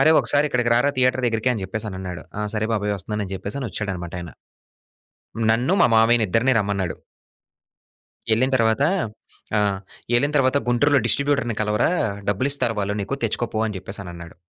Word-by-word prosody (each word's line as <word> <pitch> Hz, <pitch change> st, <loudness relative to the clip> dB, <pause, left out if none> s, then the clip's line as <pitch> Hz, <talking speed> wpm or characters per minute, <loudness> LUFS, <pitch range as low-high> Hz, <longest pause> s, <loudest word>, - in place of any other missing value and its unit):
"అరేయ్ 155 Hz, +3 st, +6 dB
ఒకసారి 145 Hz, +1 st, +3 dB
ఇక్కడికి 120 Hz, -2 st, +1 dB
రారా 125 Hz, +4 st, +3 dB
థియేటర్ 130 Hz, 0 st, +2 dB
దగ్గరికి," 115 Hz, +1 st, +1 dB
అని 110 Hz, -5 st, -4 dB
చెప్పేసి 110 Hz, +3 st, -5 dB
అనన్నాడు. 90 Hz, -3 st, -6 dB
ఆ! -, -, -1 dB
సరే 110 Hz, 0 st, -1 dB
బాబోయ్, 105 Hz, -1 st, 0 dB
వస్తున్నానని 105 Hz, 0 st, -4 dB
చెప్పేసని 125 Hz, +8 st, -4 dB
వచ్చాడనమాట 90 Hz, -5 st, -5 dB
ఆయన. 85 Hz, -2 st, -8 dB, 1.2 s
నన్ను, 120 Hz, +10 st, +2 dB
మా -, -, +7 dB
మామయ్యనిద్దరిని 115 Hz, +1 st, +3 dB
రమ్మన్నాడు. 100 Hz, -4 st, -1 dB, 1.4 s
ఏళ్ళిన 130 Hz, +4 st, +2 dB
తరువాత 115 Hz, +1 st, +2 dB, 0.8 s
ఆ! -, -, +3 dB, 0.5 s
ఏళ్ళిన 140 Hz, +4 st, +3 dB
తరువాత, 130 Hz, 0 st, +3 dB
"గుంటూరులో 140 Hz, +4 st, +3 dB
డిస్ట్రిబ్యూటర్‌ని 140 Hz, -3 st, +1 dB
కలవరా, 105 Hz, +5 st, +1 dB, 0.4 s
డబ్బులిస్తారు 120 Hz, +3 st, +1 dB
వాళ్ళు 100 Hz, +1 st, -1 dB
నీకు, 100 Hz, +7 st, -2 dB
తెచ్చుకోపో" 110 Hz, 0 st, -2 dB
అని 105 Hz, -3 st, -4 dB
చెప్పేసనన్నాడు. 90 Hz, -3 st, -8 dB
110 Hz, 140 wpm, -22 LUFS, 100-130 Hz, 1.4 s, మా